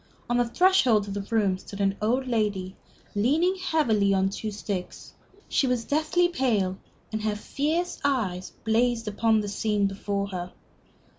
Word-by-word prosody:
On 240 0 +1
the 245 -1 +2
threshold 255 - +4
of 200 - -4
the 205 - -2
room 205 -5 +1
stood 200 - -10
an 195 -1 +2
old 250 +5 +1
lady, 205 -5 -1 0.4
leaning 295 - +2
heavily 225 - +2
on 190 0 +2
two 215 +2 -4
sticks. 200 -3 -5 0.3
She 270 - +1
was 250 -2 0
deathly 315 +4 +2
pale, 215 - 0 0.3
and 215 0 -2
her 215 -1 0
fierce 310 +10 -2
eyes 210 -10 0
blazed 230 0 +1
upon 220 +1 +2
the 205 - -4
scene 205 0 0
before 200 0 -2
her. 180 -1 -5
220 Hz, 155 wpm, -26 LUFS, 200-255 Hz, 0.4 s, threshold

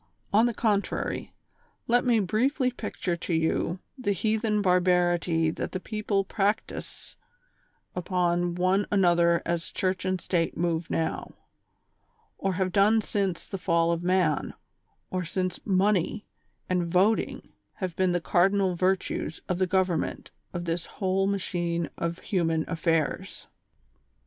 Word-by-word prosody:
On 220 +4 +5
the 240 - -1
contrary, 205 -3 -1 0.6
let 245 +1 +3
me 240 -3 +3
briefly 250 - +1
picture 185 -7 -3
to 170 0 -2
you 160 +2 0 0.2
the 250 -7 -1
heathen 215 +2 0
barbarity 175 -3 +2
that - - -5
the 185 - -2
people 210 -1 -1
practise 205 +2 -3 0.8
upon 175 -1 0
one 185 +3 +2
another 175 -3 +3
as 170 -1 -2
Church 185 -1 -1
and 185 0 0
State 170 -1 -1
move 165 -1 -1
now, 165 - -2 1.0
or 195 -1 0
have 185 0 0
done 210 +4 +4
since 195 -5 -2
the 195 - -5
fall 170 -2 +2
of 170 0 -1
man, 180 -5 +1 0.6
or 185 -1 -1
since 185 +2 -2
''money 195 0 +1 0.2
" - - -45
and 180 -2 0
" - - -7
voting 195 +5 +1
" - - -49
have 185 -4 -4
been 185 -1 +2
the 175 - +1
cardinal 190 +2 +2
virtues 185 -3 -1
of 180 -1 -1
the 185 - +2
govern 185 -3 +2
ment - - -5 0.2
of 175 0 -4
this 165 0 -2
whole 195 0 +1
machine 175 -4 -1
of 170 0 -2
human 165 -5 0
affairs. 165 -2 -1
185 Hz, 140 wpm, -27 LUFS, 170-200 Hz, 1.0 s, On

